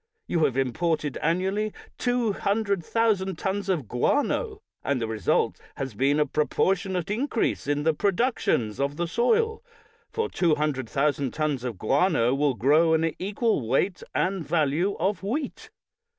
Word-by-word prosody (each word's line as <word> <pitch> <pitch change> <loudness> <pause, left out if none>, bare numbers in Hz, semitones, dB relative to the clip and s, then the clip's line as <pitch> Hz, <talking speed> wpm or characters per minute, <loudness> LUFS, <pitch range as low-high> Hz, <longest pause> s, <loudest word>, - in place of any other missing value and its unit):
You 165 -2 +1
have 130 - -1
imported 150 +3 0
annually 190 +6 0 0.3
200, 215 -5 0
000 225 +4 +2 0.2
tons 195 +3 -2
of 160 - 0
guano, 415 - 0 0.2
and 140 -2 0
the 115 - -1
result 110 -4 0
has 135 -3 -4
been 140 +7 +2
a 150 - +4
pro 150 +1 0
portionate 190 -1 0
increase 230 - -1
in 145 0 0
the 160 +1 +3
productions 195 - 0
of 140 +1 0
the 175 0 -1
soil, 445 - +1 0.5
for 450 0 -1
200,000 145 - 0
tons 150 -5 -1
of 120 -5 -4
guano 135 - +2
will 140 -1 +1
grow 155 +8 +4
an 160 -1 +1
equal 200 - 0
weight 175 - +1
and 190 -2 0
value 160 +4 +1
of 190 +2 0
wheat. 260 +9 -4
165 Hz, 140 wpm, -26 LUFS, 140-205 Hz, 0.5 s, a